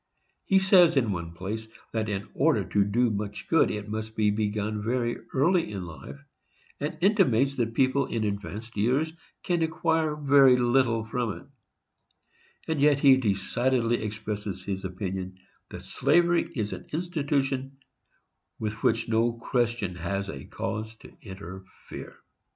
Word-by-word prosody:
He 195 - +4
says, 185 -5 +5
in 115 -6 +2
one 85 -3 -4
place, 105 +5 -5 0.3
that 110 -1 -1
in 100 -1 -3
order - - +2
to 100 - +2
do 115 +4 +1
much 105 0 -4
good 165 - +4
it 105 0 -4
must 110 +1 -5
be 105 -1 +2
begun 105 0 -1
very 120 +1 0 0.2
early 165 - +2
in 95 -3 -5
life, 80 - -10 0.6
and 145 +1 -3
intimates 140 - +3
that 115 -2 -1
people 135 0 +2
in 115 -2 -2
advanced 105 +2 -4
years 130 +10 +1 0.3
can 175 -2 0
acquire 160 -1 +1
very 140 -3 +6
little 120 -2 +2
from 115 -1 -2
it; - - -14 1.2
and 160 -3 -1
yet 145 -1 +5
he 140 -2 +7
decidedly 120 +2 0
expresses 105 -3 -5
his 95 0 -4
opinion 95 0 -4 0.3
that - - -9
slavery 175 0 +2
is 105 -4 -2
an - - -9
institution 140 -5 -1 0.8
with 110 0 -4
which 115 0 +1
no 115 +1 +2
Christian 115 -4 -1
has 100 +3 -3 0.2
cause 110 +1 -4
to - - -16
interfere. 95 -1 -10
115 Hz, 140 wpm, -27 LUFS, 105-140 Hz, 1.2 s, he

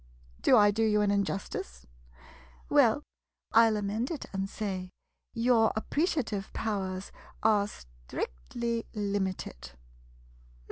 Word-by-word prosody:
Do 255 - +6
I 205 -1 +6
do 220 +2 -1
you 210 -1 +3
an 205 -1 +2
injustice? 195 - -2 0.8
Well, - - +4 0.5
I 230 0 +7
'11 220 -1 +1
amend 220 +5 -1
it 320 - -4
and 195 0 -2
say 190 -4 -4 0.2
— - - -54
your 230 -3 +5
appreciative 225 - -1
powers 195 -3 -3 0.3
are 210 -2 +4
strictly - - -5
limited. 190 - -3
205 Hz, 110 wpm, -30 LUFS, 190-225 Hz, 0.8 s, I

